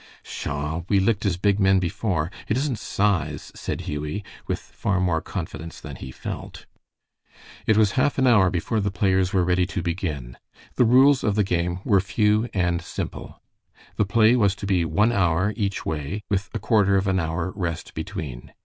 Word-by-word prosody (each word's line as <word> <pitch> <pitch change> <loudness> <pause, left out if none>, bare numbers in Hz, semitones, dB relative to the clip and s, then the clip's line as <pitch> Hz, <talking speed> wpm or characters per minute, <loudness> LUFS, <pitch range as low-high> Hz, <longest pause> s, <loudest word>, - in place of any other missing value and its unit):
"Pshaw! 75 +3 -4
we 100 - +4
licked 100 +1 +1
as 90 -3 0
big 100 +2 +2
men 95 -1 +4
before. 90 -2 -1 0.2
It 110 - +1
isn't 135 -5 -1
size," 85 -8 -1
said - - -4
Hughie, 75 +7 -4 0.2
with - - 0
far 95 -1 -2
more 90 -3 +1
confidence 85 -2 -6
than - - -8
he 65 - -8
felt. - - -7 1.0
It 110 - +4
was 105 -2 +4
half 135 +6 +1
an 130 - +3
hour 105 -7 +5
before 95 +6 -1
the 100 0 0
players 95 -1 +1
were 95 -3 +2
ready 90 0 +2
to 90 -3 -4
begin. 75 -9 -3 0.4
The 125 - +3
rules 130 +3 +5
of 105 -2 +1
the 105 - +3
game 90 -1 -1
were 100 - +4
few 105 +3 +1
and 85 -2 0
simple. - - -7 0.5
The 105 - +3
play 115 +3 +4
was 100 -5 +3
to 100 - -7
be 95 -4 +2
one 105 +7 +2
hour 95 -1 +2
each 100 -3 -2
way, 80 +7 -3
with 100 -1 0
a - - +2
quarter 100 -4 +3
of 95 - 0
an 95 -1 +1
hour 80 +2 -2
rest 85 -5 -4
between. 65 -6 -6
95 Hz, 185 wpm, -24 LUFS, 85-105 Hz, 1.0 s, hour